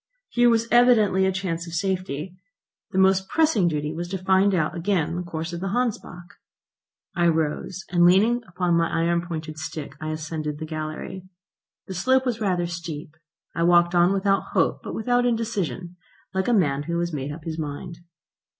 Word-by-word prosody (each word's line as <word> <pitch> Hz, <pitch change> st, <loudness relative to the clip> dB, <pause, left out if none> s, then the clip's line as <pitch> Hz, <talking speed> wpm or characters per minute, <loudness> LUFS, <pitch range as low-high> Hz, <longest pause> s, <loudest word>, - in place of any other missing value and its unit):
Here 240 Hz, 0 st, +4 dB
was 230 Hz, -1 st, +2 dB
evidently 220 Hz, -6 st, +5 dB
a -, -, +2 dB
chance 180 Hz, -3 st, -3 dB
of 165 Hz, -, -8 dB
safety. 185 Hz, -2 st, -2 dB, 0.5 s
The -, -, -4 dB
most 190 Hz, 0 st, +3 dB
pressing 305 Hz, -, +3 dB
duty 150 Hz, -1 st, -2 dB
was 170 Hz, +2 st, -4 dB
to 190 Hz, +2 st, -3 dB
find 190 Hz, +1 st, +3 dB
out 160 Hz, -1 st, 0 dB
again 170 Hz, -2 st, 0 dB
the 180 Hz, -, -2 dB
course 170 Hz, -1 st, -5 dB
of 170 Hz, -, -4 dB
the 195 Hz, -, -2 dB
Hansbach. 210 Hz, -7 st, -3 dB, 0.8 s
I 175 Hz, -2 st, +3 dB
rose, 160 Hz, +3 st, -1 dB
and 175 Hz, -1 st, +2 dB
leaning 210 Hz, +7 st, +5 dB
upon 175 Hz, -1 st, -1 dB
my 170 Hz, 0 st, +2 dB
iron 170 Hz, +1 st, +1 dB
pointed 160 Hz, -3 st, -6 dB
stick 155 Hz, -1 st, -6 dB
I 155 Hz, -, -3 dB
ascended 155 Hz, -1 st, -4 dB
the 160 Hz, -, -5 dB
gallery. 155 Hz, +4 st, -6 dB, 0.6 s
The 190 Hz, -, -7 dB
slope 260 Hz, +8 st, +2 dB
was 240 Hz, -3 st, -2 dB
rather 180 Hz, -4 st, +1 dB
steep. 170 Hz, -3 st, -6 dB, 0.4 s
I -, -, -3 dB
walked 175 Hz, 0 st, +4 dB
on 175 Hz, +1 st, +4 dB
without 195 Hz, 0 st, 0 dB
hope -, -, +1 dB
but -, -, -6 dB
without 245 Hz, +2 st, +1 dB
indecision, 210 Hz, -7 st, -2 dB, 0.4 s
like 190 Hz, 0 st, -1 dB
a -, -, +3 dB
man 145 Hz, -9 st, +2 dB
who 170 Hz, -, 0 dB
has 170 Hz, -1 st, -2 dB
made 140 Hz, -1 st, -3 dB
up 150 Hz, +1 st, -9 dB
his 165 Hz, 0 st, -5 dB
mind. 155 Hz, +3 st, -6 dB
175 Hz, 180 wpm, -24 LUFS, 160-195 Hz, 0.8 s, evidently